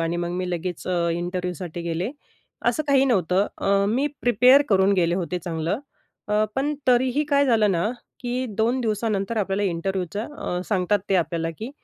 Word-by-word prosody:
आणि 165 +1 -1
मग 175 - -3
मी 180 -1 -2
लगेच 175 0 -4
अ, 175 -2 +1
इंटरव्ह्यूसाठी 175 -1 -4
गेले 170 +6 -2 0.6
असं 310 - +2
काही 275 -1 +5
नव्हतं. 195 -5 +2
अ, 200 0 +2
मी 260 +7 +1 0.2
प्रिपेअर 250 +4 +6
करून 195 -1 +4
गेले 175 -2 +2
होते 180 -1 -2
चांगलं. 165 +4 -2 0.5
अ, 210 +1 +3
पण 290 +3 0
तरीही 255 +4 +3
काय 280 -1 +3
झालं 220 -4 +3
ना, 175 +5 0 0.3
की 250 0 -2
2 235 +4 +2
दिवसानंतर 215 -1 -1
आपल्याला 195 0 0
इंटरव्ह्यूच्या 190 +4 -3
अ, 180 0 -2
सांगतात 200 0 +2
ते 195 - +2
आपल्याला, 165 -1 -1
की 230 +5 -5
195 Hz, 165 wpm, -24 LUFS, 175-240 Hz, 0.6 s, प्रिपेअर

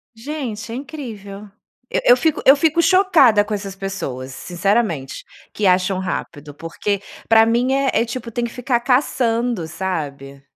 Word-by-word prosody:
Gente, 230 -4 -6
é - - -4
incrível. 215 -8 -8 0.4
Eu - - 0
eu - - +8
fico 320 -2 0
eu 270 - +9
fico 320 +3 +2
chocada 335 - +5
com 210 +1 -4
essas 195 -2 -5
pessoas, 140 -10 -5
sinceramente, 175 - -1 0.3
que 210 - 0
acham 185 +1 +2
rápido, 150 -5 -5
porque 170 +6 -3 0.3
para 225 0 +6
mim 240 +3 +1
é 270 0 +2
é, 225 - +3
tipo, 235 0 -6
tem 240 +2 -2
que 235 - -3
ficar 250 -1 -1
caçando, 240 - 0
sabe. 140 -7 -5
220 Hz, 155 wpm, -20 LUFS, 185-255 Hz, 0.4 s, eu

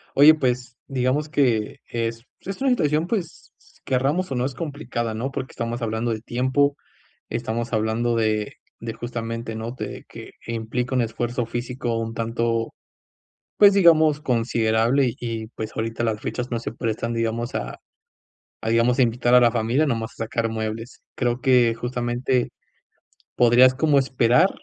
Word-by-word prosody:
Oye 145 +3 +9
pues 125 -3 -1
digamos 135 +3 0
que 120 -8 +1
es 115 0 -3 0.2
es 195 +6 -6
una 270 - +3
situación, 155 - +1
pues 185 -6 -4 0.3
queramos 140 +7 0
o - - -1
no, 125 0 0
es 135 - -3
complicada, 130 -6 -4
¿no? 120 +5 -3
Porque 135 -1 -5
estamos 115 +1 -4
hablando 115 +1 -1
de 110 -1 -3
tiempo, 130 +4 +1 0.5
estamos 115 +1 -3
hablando 110 +2 +1
de 110 -2 0 0.3
de 115 0 -4
justamente, 115 -1 -5
¿no?, 110 +1 -4
de 130 - -7
que - - -11 0.2
implica 115 +3 -2
un 125 - +3
esfuerzo 120 +1 -2
físico 120 0 -3
un 115 0 -3
tanto 115 0 -1 0.8
pues 205 -1 +7
digamos 160 -5 +5
considerable, 115 -1 +1
y 115 -2 -4
pues 110 -1 -6
ahorita 115 +1 -2
las 110 -2 -1
fechas 125 +1 -4
no 120 - -1
se 115 - -5
prestan, 115 0 -2
digamos, 115 +1 -2
a - - -4 0.8
a 110 - -2
digamos, 115 +2 +3
a - - +7
invitar 120 +1 +2
a 125 - +8
la 120 -1 +5
familia 120 +6 +1
nada 120 -6 0
más 115 - -5
a - - -4
sacar 115 +1 -1
muebles. 110 +2 -5
Creo 120 0 -1
que 125 -3 +4
justamente 120 +1 -1 0.9
podrías 125 +2 +6
como 145 +1 +3
esperar, 130 +4 +3
120 Hz, 160 wpm, -23 LUFS, 115-130 Hz, 0.9 s, Oye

